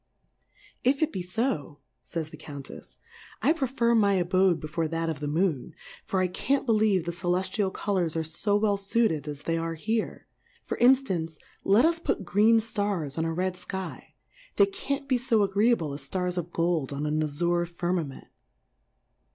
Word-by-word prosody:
If 275 +4 +3
it 315 - 0
be 185 - -2
fo, 180 - -2 0.3
fays 160 -2 -5
the - - -8
Count 140 -3 -9
tf\, - - -11 0.5
I 310 - +5
prefer 255 -6 +1
my 205 -3 +4
abode 185 -1 +3
before 155 +2 -2
that 165 +1 -2
of 155 -3 -3
the 150 - -3
Moon; 155 -3 0 0.3
for 190 - -1
I 185 - +2
can't 270 +9 0
believe 215 -6 +3
the 170 - -1
Celeftial 185 +3 -1
Colours 185 -6 -1
are 165 - 0
fo 170 +6 0
well 205 -1 +2
fuired 200 - +1
asthey 150 +3 -2
are 165 0 -3
here; 220 +7 -2 0.4
for - - -4
inftance, 215 - +3 0.3
let 210 +7 +5
us 330 0 +2
put 205 - -2
green 210 +6 +4
Stars 200 -10 -2
on 160 - -1
a 165 - -1
red 185 +2 -1
Sky, 190 +1 -7 0.4
they 405 - +6
can't 280 -8 -4
be 255 -3 +2
fo 230 -4 +2
agreeable 200 -5 +2
as 140 - -7
Stars 180 +5 -2
of 175 -1 -4
Gold 165 -5 0
on 140 +1 -3
an 155 +1 0
Azure 170 +3 0
Firmament. 175 -4 -3
180 Hz, 170 wpm, -27 LUFS, 160-220 Hz, 0.5 s, they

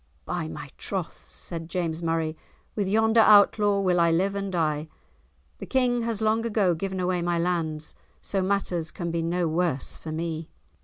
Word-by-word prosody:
"By - - -3
my 80 - -8
troth," - - -4
said 165 -1 -8
James 170 -3 -2
Murray, 165 -1 -1 0.4
"with 205 -3 0
yonder 220 +3 +3
Outlaw 205 -1 +6
will 180 -2 +2
I 170 0 +4
live 185 +4 +2
and 200 -1 -3
die; 155 -3 0 0.7
the - - -7
King 250 -2 +2
has 230 -2 -2
long 220 +1 +2
ago 210 -6 +2
given 190 +3 -3
away 180 -1 0
my 175 0 0
lands, 165 -3 -1 0.3
so 195 - -2
matters 185 -4 -1
can 170 -1 -4
be 165 0 -1
no 170 +1 0
worse 160 -4 -1
for 160 - -8
me." 160 0 -4
175 Hz, 170 wpm, -26 LUFS, 165-200 Hz, 0.7 s, Outlaw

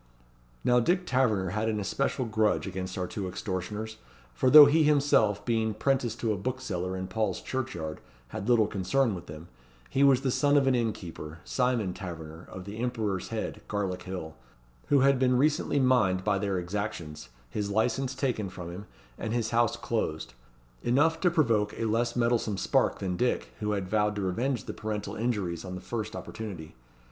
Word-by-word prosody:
Now 125 0 +4
Dick 180 +9 +1
Taverner 110 - +1
had 110 +2 0
an 105 -1 -1
especial 130 +5 -1
grudge 110 -1 +1
against 95 -1 -5
our 90 - -1
two 95 +1 -4
extortioners, 105 +4 -4 0.4
for 130 - +2
though 150 +2 +12
he 150 +3 +4
himself, 140 -8 +3
being 110 -2 0
'prentice 130 -1 0
to 115 -2 -1
a - - -3
bookseller 95 -6 -3
in 95 - -3
Paul's 110 +4 -1
Churchyard, 85 -13 -4 0.3
had 100 - -5
little 115 -3 +5
concern 110 +5 +1
with 90 - -7
them, 75 +3 -9 0.4
he 135 - +3
was 135 -2 +5
the 135 -2 0
son 145 +2 +3
of 140 - +4
an 135 - +3
inn 115 -3 +1
keeper 80 -4 -8
Simon 125 -7 0
Taverner, 85 -3 -8
of 90 -1 -8
the 105 +2 -7
Emperor's 110 -6 -2
Head, 110 -1 -4
Garlick 95 -3 -2
Hill 90 -4 -6 0.5
who 140 -2 +4
had 135 -1 +4
been 125 -1 +3
recently 145 +1 +2
mined 115 -8 +3
by 100 -1 +1
their 100 -2 -1
exactions, 90 -4 -4 0.2
his 105 - -2
licence 125 +5 0
taken 125 -7 -1
from 90 -2 -7
him, 95 +4 -8 0.3
and 110 - -3
his 115 -2 -1
house 120 -1 +2
closed: 75 -5 -2 0.5
enough 155 - +2
to 180 - +4
provoke 115 -11 +2
a 115 - -1
less 115 +2 0
mettlesome 115 -4 +1
spark - - +2
than 90 -2 -3
Dick, 65 - 0
who 105 0 -1
had 100 -2 -2
vowed 105 +1 +1
to 100 - -2
revenge 120 +8 -1
the - - -6
parental 105 -1 -4
injuries 105 -8 -2
on 90 -1 -6
the - - -5
first 110 +3 -4
opportunity. 95 -8 -7
110 Hz, 180 wpm, -28 LUFS, 95-125 Hz, 0.5 s, though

